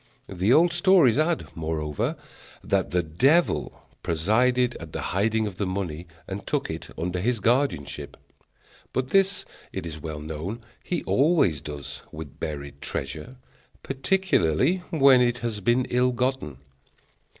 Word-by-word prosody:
The 95 +3 0
old 170 +5 +5
stories 175 - +5
add, 160 +1 +1
moreover, 80 -2 -2 0.5
that - - +1
the 90 -1 +1
devil 135 - +2 0.2
presided 120 +9 +2
at 80 -2 -10
the - - -3
hiding 110 +3 +1
of 100 -3 -5
the 100 - -1
money, 90 -3 -4 0.2
and - - -6
took - - -1
it - - -7
under 90 +2 -2
his 115 +4 0
guardianship; 115 - 0 0.8
but 130 0 -1
this, 195 0 +2 0.3
it - - -5
is 80 -2 -6
well 80 -1 -5
known, 80 +9 -5 0.2
he 175 - -2
always 135 - +3
does 75 -2 -7
with 75 -3 -9
buried 70 -2 -6
treasure, 75 - -5 0.5
particularly 135 - +1
when 140 -6 +6
it 120 0 +2
has 110 -3 -2
been 120 +5 +2
ill 125 +1 +3
gotten. 125 - -1
110 Hz, 140 wpm, -25 LUFS, 80-130 Hz, 0.8 s, when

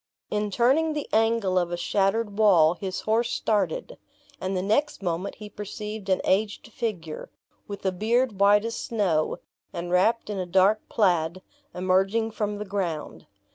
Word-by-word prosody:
In 210 0 0
turning 270 +9 +2
the 295 -1 -4
angle 220 -4 +2
of 175 -1 -2
a 175 - -2
shattered 200 +4 0
wall, 175 -7 +6
his 185 +1 -5
horse 230 +2 +1
started; - - -1 0.4
and 190 0 -2
the 180 - -1
next 220 +4 0
moment 180 +2 -2
he 210 - -9
perceived 210 0 -7
an 190 - +2
aged 210 +3 0
figure, 175 -9 -4 0.4
with 200 -1 -8
a 190 - +2
beard 220 +3 0
white 205 +2 +5
as 230 0 -3
snow, 185 -9 0 0.3
and 175 +1 -5
wrapped 210 +5 +2
in 200 - -3
a 180 - -3
dark 190 +4 +3
plaid, 180 -3 +1 0.3
emerging 195 +5 +1
from 210 -1 -2
the 210 - -5
ground. 185 -6 -4
205 Hz, 160 wpm, -26 LUFS, 185-220 Hz, 0.4 s, wall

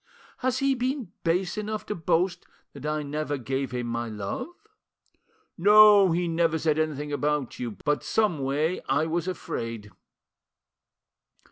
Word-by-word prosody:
Has 255 0 0
he 275 0 +2
been 255 -5 -2
base 180 +4 0
enough 215 0 -4
to - - -3
boast 175 +1 0 0.3
that 140 +1 -7
I 150 0 -1
ever 145 0 -3
gave 135 +1 -3
him 125 0 -3
my 115 0 -3
love?" 105 - -4 1.1
"No, 205 0 +7
he 175 +1 0
never 165 -1 +1
said 155 -1 +1
anything 150 -2 -2
about 145 -1 -1
you; 120 -4 -5
but 150 0 +1
someway 155 -4 0
I 145 +4 +2
was 170 +2 -2
afraid." 115 - -5
155 Hz, 135 wpm, -26 LUFS, 140-185 Hz, 1.1 s, No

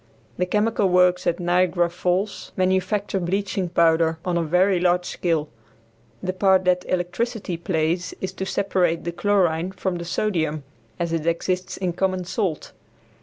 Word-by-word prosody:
The 180 - +1
chemical 210 0 +1
works 180 0 +3
at 170 - +1
Niagara 175 0 +2
Falls 180 +3 -2
manufacture 190 +2 +1
bleaching 190 +1 -1
powder 165 -1 +3
on 180 -1 0
a 170 - +2
very 180 +3 +2
large 180 0 +2
scale. 165 -5 -1 0.8
The 185 - -1
part 190 0 +3
that 180 0 +2
electricity 185 +3 -2
plays 170 0 -1
is 190 - -3
to 190 - -4
separate 180 -4 0
the 170 - -3
chlorine 180 -2 +1
from 185 -1 -3
the 170 - -6
sodium 160 -5 -1 0.4
as 170 -1 -1
it 165 -1 -2
exists 180 +2 -1
in 185 -2 -2
common 185 0 -1
salt. 180 -4 -2
180 Hz, 150 wpm, -23 LUFS, 170-190 Hz, 0.8 s, works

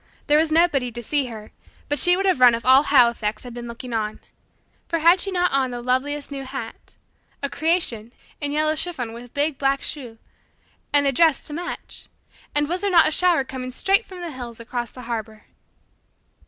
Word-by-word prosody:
There 295 +1 +4
was 315 0 +1
nobody 310 -7 +2
to 240 0 -6
see 280 +2 0
her, 215 -3 -10 0.4
but 290 0 -1
she 355 0 +4
would 390 - -1
have 375 -8 +2
run 245 -2 +7
if 230 - -7
all 260 +2 +7
Halifax 235 -6 +3
had 245 -1 -9
been 240 0 -7
looking 235 +1 -8
on. 215 -1 -2 0.7
For 335 - 0
had 335 +3 +5
she 390 - 0
not 360 -1 +1
on 270 -1 +1
the 245 -1 -5
loveliest 275 +4 -2
new 275 -1 -5
hat 260 -4 -8 0.5
a 280 - -2
"creation" 280 -8 0 0.3
in 290 -1 0
yellow 310 +1 +1
chiffon 300 -9 -3
with 240 +2 -12
big 290 -1 0
black 275 0 +1
choux 245 -6 -6 0.7
and 285 -1 +4
a 275 - +3
dress 320 +2 +3
to 295 - -6
match? 350 +3 -7 0.5
And 295 0 +2
was 355 +4 -2
there 405 - +1
not 335 -4 +6
a - - 0
shower 345 -3 +3
coming 255 -1 -6
straight 390 - +2
from 370 -4 -11
the 340 -2 -5
hills 240 -3 -8
across 240 0 -4
the 250 - -12
harbour? 220 -2 -5
275 Hz, 200 wpm, -22 LUFS, 240-320 Hz, 0.7 s, run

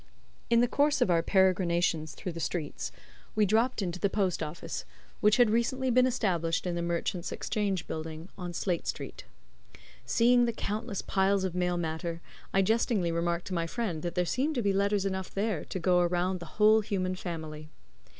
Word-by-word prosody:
In 235 0 +5
the 245 - +4
course 290 +3 +2
of 245 -8 +3
our 165 -1 +4
peregrinations 170 -5 +2
through 180 - -5
the 165 - -7
streets, 160 -3 -3 0.4
we 215 -1 +4
dropped 225 +2 +2
into 180 0 -3
the 200 - +2
post 190 -4 0
office, 155 +2 -5 0.4
which 210 +3 +4
had 240 -4 +5
recently 255 +3 +1
been 255 +1 +5
established 180 -10 0
in 180 - -1
the 170 - -2
Merchants' 170 +1 -2
Exchange 200 -5 -1
Building, 160 +1 -6
on 180 -2 -5
State 175 0 -2
Street. - - -5 0.8
Seeing 240 - +4
the 235 - -1
countless 215 -1 -3
piles 195 0 +2
of 185 -2 -1
mail 180 -1 0
matter, 165 0 -3 0.3
I 195 - +3
jestingly 215 -4 +1
remarked 170 +1 -1
to - - -4
my 170 -1 0
friend 185 -6 -3
that 175 +1 -4
there 180 -1 +2
seemed 280 - 0
to 240 - 0
be 200 -1 +2
letters 200 0 +1
enough 190 -1 -3
there 200 -5 -1
to - - -5
go 180 0 +3
around 180 +1 +1
the 170 - -8
whole 215 +1 +6
human 185 -3 -1
family. 160 -4 -6
185 Hz, 185 wpm, -29 LUFS, 170-215 Hz, 0.8 s, whole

